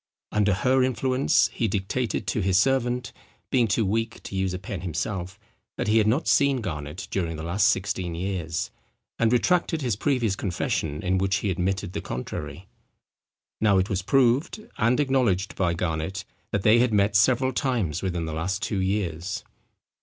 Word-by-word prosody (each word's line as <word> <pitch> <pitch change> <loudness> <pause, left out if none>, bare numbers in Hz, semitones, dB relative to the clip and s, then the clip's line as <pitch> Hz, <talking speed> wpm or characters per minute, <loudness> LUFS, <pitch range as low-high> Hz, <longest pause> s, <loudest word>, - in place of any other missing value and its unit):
Under 105 -1 +2
her 130 +5 +2
influence 130 +1 +2
he 115 - 0
dictated 105 +5 -2
to 110 - -1
his 95 -1 +2
servant, 125 +1 +1 0.4
being 125 -3 +3
too 110 +2 +1
weak 115 +3 -2
to - - -7
use 95 -1 0
a 90 - -3
pen 95 -1 -6
himself, 90 +2 -4 0.4
that - - -2
he 110 +1 +4
had 105 - +2
not 125 +9 +1
seen 140 -2 +3
Garnet 75 -5 -5
during 85 -4 -1
the 80 - -6
last 95 +5 +2
sixteen 95 -4 -1
years, 85 -2 -3 0.5
and 115 -1 +3
retracted 165 +4 +2
his 120 -5 0
previous 120 -4 0
confession 80 -6 -2
in 95 0 +1
which 95 0 +1
he 100 -1 -1
admitted 90 0 -2
the 100 - -3
contrary. 60 - -6 0.9
Now 105 -3 +4
it 95 +2 +1
was 95 -1 0
proved, 135 - +2
and 120 +5 +3
acknowledged 125 -9 +1
by 85 -3 +1
Garnet, 80 +2 -3 0.2
that 100 - -1
they 110 +2 +6
had 125 -1 +3
met 100 0 +2
several 130 +5 +3
times 120 - -1
within 90 -3 -2
the 80 - -4
last 95 +6 -2
two 100 -2 -1
years. 95 -2 -2
100 Hz, 170 wpm, -25 LUFS, 90-120 Hz, 0.9 s, they